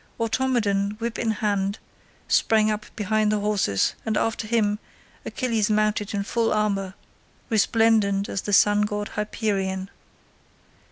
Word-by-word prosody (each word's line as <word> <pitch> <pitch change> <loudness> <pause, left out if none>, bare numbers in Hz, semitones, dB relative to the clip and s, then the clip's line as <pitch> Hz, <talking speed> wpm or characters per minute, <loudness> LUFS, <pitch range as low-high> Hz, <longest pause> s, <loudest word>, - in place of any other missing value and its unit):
Automedon, 220 -4 0
whip 235 0 -3
in 230 - 0
hand, 205 -2 -1 0.5
sprang 215 -1 +3
up 215 0 -4
behind 215 0 +1
the 215 - +1
horses, 205 - +1
and 220 -1 -1
after 225 -1 -1
him 210 -2 +1 0.5
Achilles 230 -4 -1
mounted 215 -1 0
in 200 - -1
full 230 +2 0
armour, 200 -3 -1 0.6
resplendent 220 -2 +3
as 195 - -3
the 205 - -4
sun 205 +1 +5
god 210 0 -2
Hyperion. 195 -3 -2
210 Hz, 125 wpm, -24 LUFS, 200-220 Hz, 0.6 s, sun